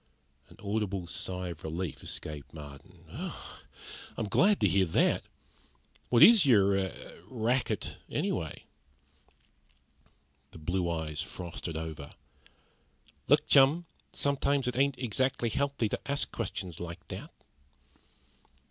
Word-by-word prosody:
An - - -16
audible 100 -3 -1
sigh 90 +1 -3
of 85 -2 -8
relief 80 0 -4
escaped 75 0 -5
Marden. 75 +4 -11
"I'm - - -4 0.8
certainly 110 -3 -2
glad 205 +1 +4
to - - +5
hear 95 -1 +3
that! 80 - +3 0.9
What 120 - +7
is 225 -4 +9
your 105 -8 +5
er 95 -3 -4
racket, 120 +2 -1
anyway?" - - -2 1.9
The - - -13
blue 85 +3 -1
eyes 80 -2 -2
frosted 85 -2 -6
over. 80 -3 -6 1.2
"Look, - - +5
chum, 140 +5 +5 0.3
sometimes 140 -1 +1
it 125 - -1
ain't 135 0 +2
exactly 125 0 0
healthy 140 -1 0
to - - -2
ask 140 - -1
questions 90 -5 -4
like 85 -1 -7
that." - - -7
95 Hz, 115 wpm, -30 LUFS, 85-130 Hz, 1.9 s, is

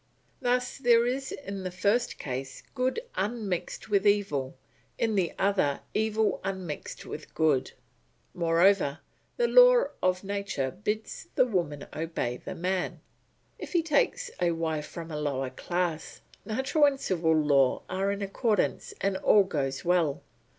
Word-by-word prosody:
Thus 250 +1 0
there 235 -3 +5
is 265 +2 -2
in 200 -8 -6
the 185 - -3
first 205 +7 0
case 130 0 -5
good 260 - 0
unmixed 205 -4 -3
with 205 -1 +2
evil, 150 -11 +1 0.4
in 225 -1 +1
the 185 -5 +1
other 190 -8 +1
evil 220 0 +1
unmixed 190 -5 -5
with 155 - -8
good. 155 -5 +2 0.6
Moreover, 170 -2 +3 0.4
the 480 -1 +3
law - - +7 0.2
of 185 0 +1
nature 195 -9 -2
bids 210 +5 -4
the - - +5
woman 170 - -2
obey 155 -6 -2
the - - -7
man. 185 +1 -2 0.6
If - - -7
he 340 -2 +3
takes 465 - +1
a 175 -1 +3
wife 160 -2 -2
from 165 -1 -8
a 150 -1 -3
lower 135 -3 -2
class, 175 +2 -3 0.2
natural 265 +7 +2
and 275 -1 +2
civil 165 -8 +1
law 140 -4 +3
are 195 +2 -1
in 200 0 -3
accordance 210 +1 0
and 195 0 +1
all 205 +1 +5
goes 140 -7 -3
well. 170 -5 +1
190 Hz, 145 wpm, -28 LUFS, 160-220 Hz, 0.6 s, law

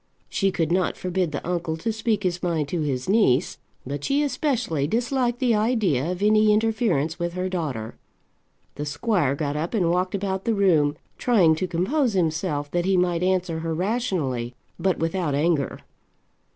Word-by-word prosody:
She 195 - +1
could 165 -3 -1
not 180 +1 +1
forbid 180 -2 -1
the 145 - -5
uncle 170 -2 -2
to 220 +7 -2
speak 220 -1 -1
his 180 -1 -1
mind 165 -5 0
to 170 0 -1
his 130 -4 -2
niece, 190 - +2 0.3
but 140 +2 -5
she 285 +2 +1
especially 250 - 0
disliked 245 - 0
the 245 -2 +2
idea 210 - +1
of 185 +2 -4
any 215 0 +5
interference 210 - +1
with 175 0 -2
her 185 +1 -2
daughter. 145 -12 -4 0.8
The 145 - -3
squire 145 - 0
got 145 -1 -2
up 160 +8 -2
and 175 -5 +2
walked 180 +2 0
about 190 -1 -2
the 230 - +1
room, 160 -7 +3 0.2
trying 195 -10 +4
to 185 +4 -2
compose 235 - 0
himself 155 -5 -1
that 175 0 0
he 190 -1 +2
might 175 -1 +1
answer 180 -3 0
her 165 0 -2
rationally, 165 - -1 0.2
but 190 -1 +1
without 165 -3 -1
anger. 150 -1 +1
180 Hz, 170 wpm, -24 LUFS, 155-210 Hz, 0.8 s, any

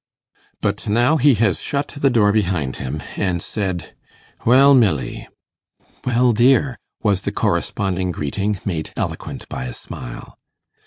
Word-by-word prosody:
But 105 +2 -2
now 120 +9 +3
he 140 -2 +5
has 105 -5 +1
shut 145 0 -2
the 140 -1 +1
door 110 -5 +4
behind 90 -10 0
him, 70 +3 -5
and 90 -3 0
said, 95 -2 -4 0.5
'Well, 135 +4 +6
Milly!' 95 - +1 0.8
'Well, 125 0 +3
dear!' 125 +3 +3 0.2
was 100 -4 +2
the - - -2
corresponding 95 -2 -1
greeting, 95 +6 -2
made 80 -6 -3
eloquent - - -4
by 65 - -5
a 60 - -5
smile. - - -9
105 Hz, 135 wpm, -20 LUFS, 90-125 Hz, 0.8 s, Well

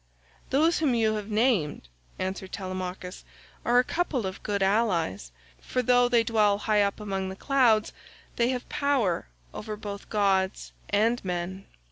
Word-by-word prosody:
"Those 315 +5 +3
whom 285 -6 +2
you 220 -2 +2
have 210 0 -4
named," 210 - +1 0.3
answered 190 0 -4
Telemachus, 185 -1 -5 0.4
"are 240 +1 +3
a 250 - +6
couple 280 - -1
of 190 0 -5
good 200 -2 -1
allies, 185 - 0 0.3
for 255 - -2
though 245 0 +4
they 235 -2 +4
dwell 215 -3 +3
high 210 0 +2
up 200 +1 0
among 195 -2 -3
the 190 - -6
clouds 240 -3 +2 0.4
they 235 0 +2
have 250 -1 -3
power 260 - 0 0.3
over 215 0 -5
both 205 -1 -7
gods 195 -2 +1 0.2
and 225 +4 +2
men." 180 +1 -4
210 Hz, 150 wpm, -27 LUFS, 190-240 Hz, 0.4 s, a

